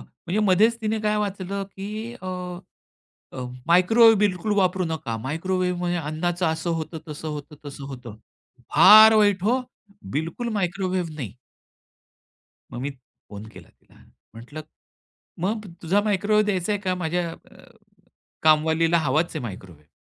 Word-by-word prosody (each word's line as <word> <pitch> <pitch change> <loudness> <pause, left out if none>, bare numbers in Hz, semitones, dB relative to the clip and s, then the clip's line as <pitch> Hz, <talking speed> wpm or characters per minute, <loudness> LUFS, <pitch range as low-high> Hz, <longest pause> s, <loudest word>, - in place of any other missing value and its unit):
म्हणजे 180 +5 -6
मध्येच 215 +4 +3
तिने 220 0 0
काय 210 0 0
वाचलं, 200 -1 -3
की 210 +4 -7
अ, - - -7 1.1
अ, - - -8 0.3
मायक्रोवेव्ह 220 +6 +6
बिलकुल 205 0 0
वापरू 185 -1 +2
नका. 140 -8 -4
मायक्रोवेव्हमध्ये 175 +6 -2
अन्नाचं 170 +3 -2
असं 160 +2 -1
होतं, 160 +1 -6
तसं 150 +1 -6
होतं, 150 0 -7
तसं 140 -1 -8
होतं. 125 -5 -9 0.6
फार 220 +1 +9
वाईट 205 -3 +3
हो, 250 +5 +2 0.5
बिलकुल 165 - -3
मायक्रोवेव्ह 185 -3 -2
नाही. 125 -10 -6 1.4
मग 120 - -6
मी 140 - -3 0.4
फोन 105 +1 -9
केला - - -14
तिला. - - -26 0.4
म्हटलं 125 +7 -9 0.8
मग, 210 +2 -2 0.2
तुझा 190 +5 +2
मायक्रोवेव्ह 210 +1 +2
द्यायचा 195 0 0
आहे 205 - -2
का 185 -2 -1
माझ्या 175 0 -2
अ, - - -15 0.9
कामवालीला? 160 +2 +3
हवाच 155 +2 +1
आहे - - -3
मायक्रोवेव्ह. 90 -9 -10
180 Hz, 130 wpm, -24 LUFS, 155-205 Hz, 1.4 s, फार